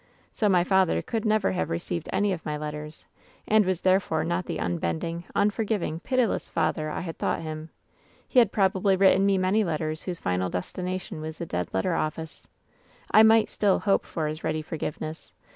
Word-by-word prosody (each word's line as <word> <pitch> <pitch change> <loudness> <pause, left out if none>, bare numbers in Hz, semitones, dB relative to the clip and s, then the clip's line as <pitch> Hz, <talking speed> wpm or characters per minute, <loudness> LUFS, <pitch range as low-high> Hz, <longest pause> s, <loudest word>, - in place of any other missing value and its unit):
"So 210 - +1
my 180 -2 +4
father 190 - +3
could 225 -1 -3
never 215 -2 +2
have 185 - -2
received 85 0 -3
any 205 -1 +1
of 165 - -6
my 150 -1 -3
letters, 150 +1 -7 0.4
and 215 0 +5
was 185 -2 -1
therefore 185 -4 +2
not 170 +2 -2
the - - -3
unbending, 85 - -2
unforgiv 210 0 +1
ing, 160 - -3
pitiless 250 +2 0
father 155 -2 0
I - - -3
had 165 -2 -6
thought - - -1
him. 155 0 -6 0.6
He 255 - +4
had 230 -5 +4
probably 195 -1 +2
written 195 +1 +4
me 195 -1 +3
many 190 +4 +2
letters 155 -3 -2
whose 175 -3 -5
final 90 0 -1
destination 180 - -4
was 155 0 -6
the 170 - -4
dead 90 - -3
letter 95 - 0
office. 155 +1 -4 0.6
I 215 - +8
might 220 0 +6
still 200 -2 +2
hope 200 -2 +1
for 160 - -3
his 155 +2 -4
ready 155 0 -1
for 160 - -6
giveness. 155 +1 -6
175 Hz, 190 wpm, -26 LUFS, 155-195 Hz, 0.6 s, I